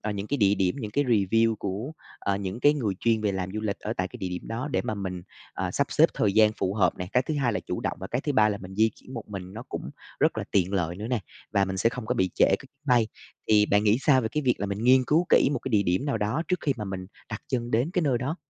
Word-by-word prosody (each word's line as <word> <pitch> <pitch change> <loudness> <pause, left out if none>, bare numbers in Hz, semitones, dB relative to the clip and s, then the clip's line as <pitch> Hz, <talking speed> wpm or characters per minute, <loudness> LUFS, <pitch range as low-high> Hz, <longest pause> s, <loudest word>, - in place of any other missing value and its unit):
ờ, 105 - -3
những 100 0 -4
cái 145 - -1
địa 100 -4 +4
điểm, 95 +3 0
những 110 -4 -5
cái 145 +5 +1
review 115 0 +3
của, 105 +10 -4 0.3
ờ, 100 0 -1
những 100 +4 -4
cái 145 +1 +5
người 110 -9 -1
chuyên 115 -2 +2
về 105 -2 0
làm 95 -1 -3
du 110 - -3
lịch 100 -2 -2
ở 110 - -4
tại 90 0 -1
cái - - -11
địa 95 - -3
điểm 90 0 -5
đó 120 +6 -3
để 95 -6 0
mà 110 - -2
mình, 95 -3 -5 0.3
ờ, - - -2
sắp - - 0
xếp - - +5
thời 100 - +1
gian 110 0 +5
phù 95 -2 -2
hợp 90 -5 +2
này, 90 0 -5
cái 125 - +3
thứ 155 - -3
hai 130 -6 +1
là - - -1
chủ - - -4
động - - -2
và 95 - -5
cái 125 +5 -2
thứ 145 - -2
ba 110 -3 +4
là 100 - -2
mình 95 +1 -9
di 110 +2 +3
chuyển 130 - -13
một 115 - -5
mình 95 -2 -7
nó 115 +3 -7
cũng - - -5 0.3
rất - - +2
là - - -2
tiện 95 -1 +1
lợi 90 -2 -1
nữa 105 +2 -5
nè, 125 - +2 0.3
và 100 -2 +3
mình 95 0 -4
sẽ 115 - +3
không 125 -3 -6
có - - 0
bị 95 -1 +1
trễ - - +5
cái 95 - +3
chuyến 140 +3 -19
bay. 120 -3 +4 0.4
Thì 105 -1 +5
bạn 105 +1 +2
nghĩ 105 +3 +4
sao 135 -3 +4
về 110 - -2
cái 150 - 0
việc 125 -2 +3
là 100 - -1
mình 100 +3 -3
nghiên 130 0 +6
cứu 165 +6 +2
kỹ - - +5
một - - 0
cái 130 - -6
địa 105 -2 +3
điểm 90 +8 0
nào 140 - -1
đó 110 +10 0
trước 180 -2 +1
khi 140 - +1
mà 105 - -4
mình 95 -1 -5 0.2
đặt 105 - -5
chân 120 -2 -2
đến 125 +9 +1
cái 180 - +1
nơi 130 -5 +2
đó? 140 +7 -3
110 Hz, 315 wpm, -26 LUFS, 95-125 Hz, 0.4 s, nghiên